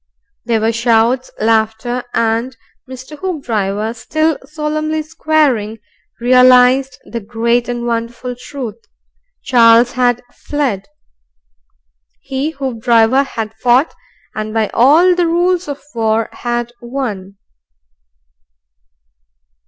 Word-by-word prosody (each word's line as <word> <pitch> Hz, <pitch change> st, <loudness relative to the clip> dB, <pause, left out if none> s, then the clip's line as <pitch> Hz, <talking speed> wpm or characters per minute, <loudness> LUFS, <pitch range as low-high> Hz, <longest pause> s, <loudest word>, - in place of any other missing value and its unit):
There 230 Hz, -2 st, +1 dB
were 225 Hz, +1 st, +2 dB
shouts, 235 Hz, +2 st, +1 dB
laughter, 225 Hz, +2 st, 0 dB
and 230 Hz, +2 st, 0 dB, 0.3 s
Mr. 260 Hz, +3 st, -10 dB
Hoopdriver, 225 Hz, -, -2 dB
still 310 Hz, +6 st, -1 dB
solemnly 310 Hz, +1 st, -2 dB
squaring, 300 Hz, -9 st, 0 dB, 0.4 s
realized 255 Hz, +1 st, +5 dB
the 235 Hz, -, -5 dB
great 235 Hz, +2 st, -1 dB
and 240 Hz, 0 st, -3 dB
wonderful 235 Hz, +1 st, -3 dB
truth 245 Hz, -3 st, -8 dB, 0.6 s
Charles 235 Hz, -1 st, +5 dB
had 245 Hz, -1 st, +1 dB
fled. 265 Hz, -10 st, -3 dB, 1.3 s
He, 270 Hz, +3 st, -3 dB
Hoopdriver, 245 Hz, -3 st, +2 dB
had 225 Hz, -5 st, -5 dB
fought 245 Hz, +6 st, +2 dB, 0.4 s
and, 215 Hz, 0 st, -5 dB
by 220 Hz, -2 st, +1 dB
all 315 Hz, +9 st, +5 dB
the 350 Hz, -1 st, +1 dB
rules 355 Hz, +2 st, +1 dB
of 285 Hz, -1 st, -5 dB
war, 225 Hz, -1 st, 0 dB
had 240 Hz, 0 st, -3 dB
won. 220 Hz, -7 st, -5 dB
245 Hz, 100 wpm, -16 LUFS, 225-275 Hz, 1.3 s, realized